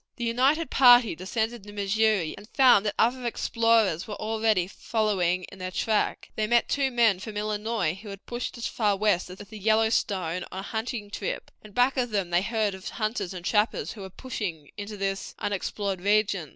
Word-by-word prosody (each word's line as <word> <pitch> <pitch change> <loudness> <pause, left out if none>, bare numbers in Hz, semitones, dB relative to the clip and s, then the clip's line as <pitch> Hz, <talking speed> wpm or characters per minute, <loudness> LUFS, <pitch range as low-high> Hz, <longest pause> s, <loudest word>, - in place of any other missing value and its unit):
The 235 - -4
united 265 +8 +2
party 245 -3 +7
descended 220 +6 -2
the 205 +1 -11
Missouri, 205 -3 +1
and 210 +3 -14
found 250 -7 +5
that 205 - -1
other 250 +2 +2
explorers 230 -6 +1
were 210 - -5
already 220 -3 +1
following 190 -3 0
in 195 - -12
their 185 0 -4
track. 210 +3 -1
They 215 0 0
met 240 +1 +3
two 275 -1 +1
men 230 -6 +3
from 210 +1 -7
Illinois 210 -4 -1
who 200 +3 -11
had 195 0 -9
pushed 240 +1 -5
as 235 - -5
far 210 -3 +1
west 200 -4 +1
as 180 - -9
the 210 +2 -10
Yellowstone 200 -5 +1
on 190 - -5
a - - -5
hunting 220 -1 -4
trip, 200 - -4
and 215 -2 -15
back 250 +2 +3
of 245 -1 +1
them 195 -5 -1
they 175 +1 +3
heard 215 -1 0
of 190 +2 -7
hunters 215 -4 -2
and 180 -2 -8
trappers 210 +2 +1
who 210 - -9
were 190 - -7
pushing 185 - -6
into 205 0 -7
this 195 0 -3
unexplored 200 -1 -3
region. 200 -5 +1
210 Hz, 190 wpm, -27 LUFS, 195-230 Hz, -, party